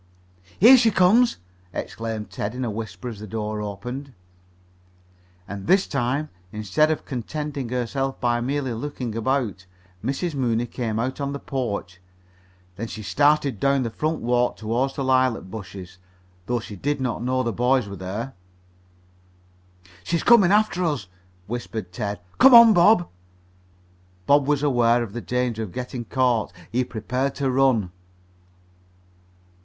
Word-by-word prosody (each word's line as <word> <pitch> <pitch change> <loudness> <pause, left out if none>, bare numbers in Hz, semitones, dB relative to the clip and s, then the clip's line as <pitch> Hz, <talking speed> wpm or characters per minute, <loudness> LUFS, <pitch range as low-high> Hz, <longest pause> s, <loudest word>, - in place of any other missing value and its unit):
"Here 245 +7 +9
she 230 -2 +4
comes!" 215 +5 +4 0.4
exclaimed 110 -2 -5
Ted 105 +4 -4
in 130 0 -2
a 115 - -2
whisper 105 -1 -6
as 115 -4 -6
the 110 - -8
door 105 +1 -3
opened. 125 +7 -6 1.3
And 100 -1 -7
this 190 +1 +4
time, 135 +3 -1 0.2
instead 110 +9 +1
of 155 - -2
contenting 140 +1 -4
herself 130 +2 -2
by 120 -1 +1
merely 135 0 -2
looking 125 -2 -5
about, 115 -6 -1 0.4
Mrs. 140 +7 -2
Mooney 120 -4 0
came 115 -2 -3
out 130 +5 -2
on 140 0 -2
the 140 - -5
porch. 105 -11 -4 0.8
Then 115 +3 -4
she 110 -1 -7
started 145 +3 +2
down 140 -1 +2
the 115 - -3
front 155 +6 -2
walk 125 +1 +1
toward 120 +5 -1
the 140 - -2
lilac 130 -2 +2
bushes, 95 -2 -9 0.5
though 120 0 0
she 110 -2 -9
did 145 +8 -1
not 125 -3 -2
know 130 +1 0
the 115 -2 -2
boys 125 +1 +2
were 100 - -7
there. 100 +8 -5 1.7
"She's 165 - -1
comin' 210 -7 +6
after 210 -3 +2
us," 145 - -2 0.4
whispered 110 -3 -5
Ted. 100 +2 -4 0.2
"Come 260 -1 +9
on, 235 -1 +10
Bob." 175 0 +5 1.2
Bob 140 +3 +4
was 145 -1 +1
aware 120 -4 +3
of 105 -4 -8
the 120 - -4
danger 125 -2 -1
of 105 -5 -5
getting 125 +3 -5
caught. 125 -5 +1 0.2
He 125 +3 +1
prepared 125 +3 -3
to 135 -2 0
run. 125 -8 +2
125 Hz, 145 wpm, -23 LUFS, 110-140 Hz, 1.7 s, on